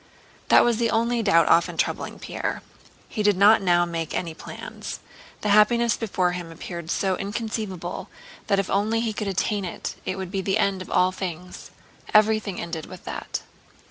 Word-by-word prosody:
'" -, -, -28 dB
That -, -, +7 dB
was 240 Hz, -2 st, +2 dB
the 230 Hz, 0 st, +1 dB
only 235 Hz, +1 st, +1 dB
doubt 170 Hz, -7 st, +4 dB
often 170 Hz, -, +3 dB
troubling -, -, -1 dB
Pierre. -, -, -4 dB, 0.4 s
He 215 Hz, -, -3 dB
did 205 Hz, -2 st, +3 dB
not 205 Hz, +3 st, +6 dB
now 175 Hz, -2 st, +3 dB
make 165 Hz, -2 st, -4 dB
any 170 Hz, -3 st, -2 dB
plans. -, -, -8 dB, 0.4 s
The 210 Hz, -, -1 dB
happiness 230 Hz, +3 st, +5 dB
before 185 Hz, -5 st, 0 dB
him 175 Hz, -2 st, -6 dB
appeared 170 Hz, 0 st, -7 dB
so 190 Hz, +1 st, +1 dB
inconceivable 200 Hz, -4 st, -4 dB, 0.4 s
that 200 Hz, -, +3 dB
if 195 Hz, -1 st, 0 dB
only 215 Hz, +3 st, +1 dB
he 225 Hz, -2 st, -1 dB
could 210 Hz, -1 st, -3 dB
attain 200 Hz, +1 st, 0 dB
it, 180 Hz, -, -5 dB
it 185 Hz, -, -3 dB
would 190 Hz, -2 st, -5 dB
be 195 Hz, -1 st, -1 dB
the 195 Hz, 0 st, +1 dB
end 195 Hz, -1 st, +1 dB
of 185 Hz, -, -8 dB
all 185 Hz, 0 st, +3 dB
things. 180 Hz, -1 st, -6 dB, 0.5 s
Everything 215 Hz, -3 st, +3 dB
ended 165 Hz, -2 st, -5 dB
with 185 Hz, -1 st, -11 dB
that. -, -, -5 dB
195 Hz, 180 wpm, -24 LUFS, 175-215 Hz, 0.5 s, That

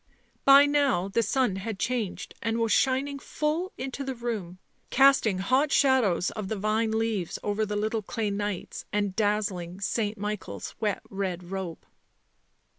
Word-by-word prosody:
By 275 Hz, +1 st, +9 dB
now 280 Hz, -10 st, +2 dB
the 215 Hz, +4 st, +2 dB
sun 245 Hz, -4 st, +1 dB
had 205 Hz, +1 st, -4 dB
changed 230 Hz, -3 st, -2 dB
and 225 Hz, 0 st, -1 dB
was 230 Hz, -1 st, +1 dB
shining 275 Hz, +2 st, +2 dB
full 310 Hz, +7 st, -2 dB
into 265 Hz, +2 st, -4 dB
the 265 Hz, -1 st, -4 dB
room, 220 Hz, -7 st, -4 dB, 0.3 s
casting 265 Hz, -7 st, +5 dB
hot 260 Hz, +10 st, +2 dB
shadows 245 Hz, -11 st, +3 dB
of 215 Hz, -3 st, -5 dB
the 220 Hz, -, -2 dB
vine 215 Hz, +2 st, 0 dB
leaves 220 Hz, -5 st, -1 dB
over 210 Hz, +1 st, 0 dB
the 210 Hz, -, -3 dB
little 215 Hz, +2 st, 0 dB
clay 210 Hz, +1 st, -2 dB
knights, 205 Hz, -2 st, -4 dB
and 205 Hz, -2 st, -1 dB
dazzling 200 Hz, -4 st, -1 dB
St. 210 Hz, +1 st, -1 dB
Michael's 200 Hz, -, -5 dB
wet 210 Hz, -3 st, -1 dB
red 185 Hz, -2 st, -4 dB
robe. 190 Hz, -4 st, -5 dB
215 Hz, 150 wpm, -27 LUFS, 195-255 Hz, 0.3 s, By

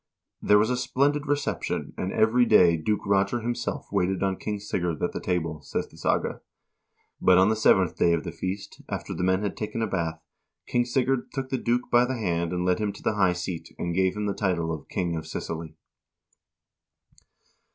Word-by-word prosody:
"There 105 Hz, -, +5 dB
was 110 Hz, +4 st, +3 dB
a 125 Hz, -, +1 dB
splendid 145 Hz, +4 st, +1 dB
reception, 145 Hz, 0 st, -2 dB
and 95 Hz, -, -3 dB
every 110 Hz, +3 st, +4 dB
day 90 Hz, -7 st, +6 dB
Duke 100 Hz, +6 st, -1 dB
Roger 100 Hz, +4 st, +2 dB
himself 120 Hz, +1 st, -3 dB
waited 95 Hz, +2 st, +1 dB
on 95 Hz, -1 st, +1 dB
King 105 Hz, -1 st, -3 dB
Sigurd 90 Hz, -5 st, -2 dB
at -, -, +1 dB
the -, -, -4 dB
table," 80 Hz, -4 st, -2 dB
says -, -, -3 dB
the -, -, -18 dB
saga. -, -, -1 dB, 0.4 s
" -, -, -43 dB
But 90 Hz, -1 st, +6 dB
on 95 Hz, +2 st, +5 dB
the 110 Hz, -, +2 dB
seventh 95 Hz, -5 st, +3 dB
day 85 Hz, -, +4 dB
of 80 Hz, -3 st, 0 dB
the -, -, -5 dB
feast, 95 Hz, +2 st, -5 dB
after -, -, -4 dB
the -, -, -4 dB
men 95 Hz, +2 st, +2 dB
had 105 Hz, -, -2 dB
taken 110 Hz, +1 st, -3 dB
a -, -, +2 dB
bath, 85 Hz, -5 st, -2 dB, 0.5 s
King 120 Hz, 0 st, +1 dB
Sigurd 130 Hz, +1 st, 0 dB
took 135 Hz, -2 st, -3 dB
the 130 Hz, -, -1 dB
duke 120 Hz, +1 st, 0 dB
by 120 Hz, 0 st, +5 dB
the 130 Hz, 0 st, -2 dB
hand 85 Hz, -5 st, -1 dB
and 90 Hz, 0 st, -1 dB
led 90 Hz, 0 st, +2 dB
him 105 Hz, -1 st, 0 dB
to -, -, -13 dB
the -, -, +1 dB
high 95 Hz, -3 st, +3 dB
seat 90 Hz, -1 st, -6 dB
and 85 Hz, -, -2 dB
gave 95 Hz, +2 st, +1 dB
him 105 Hz, -, -1 dB
the 100 Hz, -, 0 dB
title 85 Hz, -5 st, -1 dB
of 80 Hz, -, -8 dB
'King 85 Hz, -2 st, -1 dB
of 80 Hz, -, -5 dB
Sicily.'" 80 Hz, -1 st, -5 dB
95 Hz, 205 wpm, -26 LUFS, 90-115 Hz, 0.5 s, day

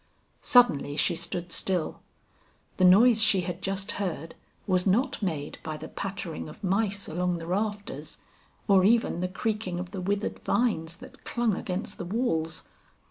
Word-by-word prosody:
Suddenly 150 Hz, -, +4 dB
she 170 Hz, +3 st, +2 dB
stood 170 Hz, +1 st, -3 dB
still; 180 Hz, -3 st, 0 dB, 0.8 s
the -, -, +2 dB
noise 220 Hz, +5 st, +7 dB
she 210 Hz, -3 st, +5 dB
had 180 Hz, 0 st, -5 dB
just 195 Hz, +1 st, -2 dB
heard, 165 Hz, -5 st, -4 dB, 0.3 s
was 185 Hz, -1 st, +1 dB
not 225 Hz, +8 st, +1 dB
made 155 Hz, -7 st, -3 dB
by 155 Hz, -1 st, -5 dB
the -, -, -8 dB
pattering 190 Hz, -6 st, -5 dB
of 205 Hz, -, -13 dB
mice 200 Hz, +1 st, 0 dB
along 180 Hz, +2 st, -1 dB
the 165 Hz, -, -7 dB
rafters, 205 Hz, +3 st, -3 dB, 0.5 s
or 195 Hz, -3 st, +5 dB
even 225 Hz, -3 st, +3 dB
the 180 Hz, -, 0 dB
creaking 190 Hz, -1 st, -2 dB
of 180 Hz, 0 st, -6 dB
the 195 Hz, -2 st, -5 dB
withered 200 Hz, +3 st, -2 dB
vines 170 Hz, -9 st, 0 dB
that -, -, -14 dB
clung 235 Hz, -4 st, 0 dB
against 195 Hz, +4 st, -4 dB
the 175 Hz, -, -4 dB
walls! 170 Hz, -6 st, -1 dB
185 Hz, 155 wpm, -27 LUFS, 175-210 Hz, 0.8 s, noise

